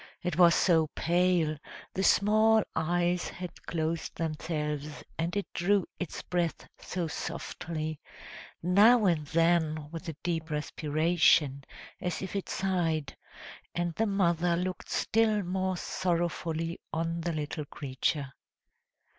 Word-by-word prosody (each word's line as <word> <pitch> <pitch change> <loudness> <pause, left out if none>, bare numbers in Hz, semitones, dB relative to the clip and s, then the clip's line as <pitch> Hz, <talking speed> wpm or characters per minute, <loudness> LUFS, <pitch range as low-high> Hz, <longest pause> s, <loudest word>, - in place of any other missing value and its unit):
It 175 -2 -1
was 170 -1 +6
so 160 -3 +4
pale, 170 -3 +2 0.3
the 190 - -1
small 215 +2 +4
eyes 175 +2 +1
had 180 0 -9
closed 165 0 -2
themselves, 150 -2 -3 0.2
and 170 +4 -1
it 200 - -1
drew 195 +2 +2
its 180 - -5
breath 175 -2 -2
so 180 -2 -3
softly, 155 -1 -4 0.6
now 210 +6 +6
and 160 -5 +2
then, 160 -2 +1
with 165 +1 -6
a 160 - -5
deep 165 -2 -2
respiration, 150 -2 +2 0.4
as 180 +1 -2
if 190 - -5
it 195 - -3
sighed; 165 -7 -1 0.6
and 175 -1 -1
the 225 +6 0
mother 175 -3 +2
looked 180 +1 -3
still 215 -2 +2
more 185 +1 -1
sorrowfully 170 -2 -1
on 165 +1 -1
the 170 +1 -1
little 150 0 -3
creature. 140 0 -2
170 Hz, 120 wpm, -30 LUFS, 155-180 Hz, 0.6 s, was